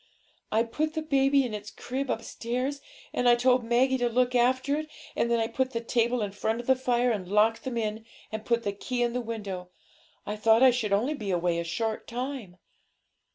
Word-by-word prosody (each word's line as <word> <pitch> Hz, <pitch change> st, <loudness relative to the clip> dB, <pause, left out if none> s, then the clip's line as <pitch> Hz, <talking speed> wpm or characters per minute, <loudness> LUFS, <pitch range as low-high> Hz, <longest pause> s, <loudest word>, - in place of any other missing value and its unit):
I 220 Hz, +1 st, +3 dB
put 310 Hz, +7 st, -2 dB
the 315 Hz, -, -1 dB
baby 275 Hz, -2 st, +3 dB
in 235 Hz, -, -4 dB
its 210 Hz, 0 st, -6 dB
crib 265 Hz, +4 st, -4 dB
upstairs, 250 Hz, +5 st, -3 dB, 0.3 s
and 245 Hz, -, +3 dB
I 240 Hz, -, +7 dB
told 250 Hz, 0 st, +3 dB
Maggie 255 Hz, +3 st, +2 dB
to 245 Hz, 0 st, +1 dB
look 250 Hz, +1 st, +2 dB
after 255 Hz, +3 st, +2 dB
it, 310 Hz, 0 st, -5 dB, 0.3 s
and 235 Hz, -, +1 dB
then 235 Hz, 0 st, +2 dB
I 225 Hz, -, +2 dB
put 260 Hz, +3 st, -1 dB
the 230 Hz, -, 0 dB
table 235 Hz, 0 st, +1 dB
in 205 Hz, -, -3 dB
front 220 Hz, +3 st, -1 dB
of 240 Hz, -, -6 dB
the 260 Hz, -, +4 dB
fire, 250 Hz, -1 st, +1 dB
and 195 Hz, -5 st, -3 dB
locked 220 Hz, +4 st, +3 dB
them 255 Hz, -2 st, -3 dB
in, 220 Hz, -1 st, -2 dB, 0.3 s
and 220 Hz, 0 st, -4 dB
put 235 Hz, +1 st, +1 dB
the 200 Hz, -, -1 dB
key 245 Hz, +4 st, -2 dB
in 240 Hz, -1 st, 0 dB
the 250 Hz, -, -1 dB
window. 200 Hz, -6 st, -5 dB, 0.6 s
I 210 Hz, -, -4 dB
thought 225 Hz, +3 st, +5 dB
I 260 Hz, -, +8 dB
should 230 Hz, -4 st, -1 dB
only 225 Hz, +9 st, +2 dB
be 215 Hz, -9 st, -5 dB
away 175 Hz, -2 st, +1 dB
a -, -, -1 dB
short 215 Hz, +6 st, -3 dB
time.' 245 Hz, -6 st, -5 dB
235 Hz, 215 wpm, -28 LUFS, 220-255 Hz, 0.6 s, I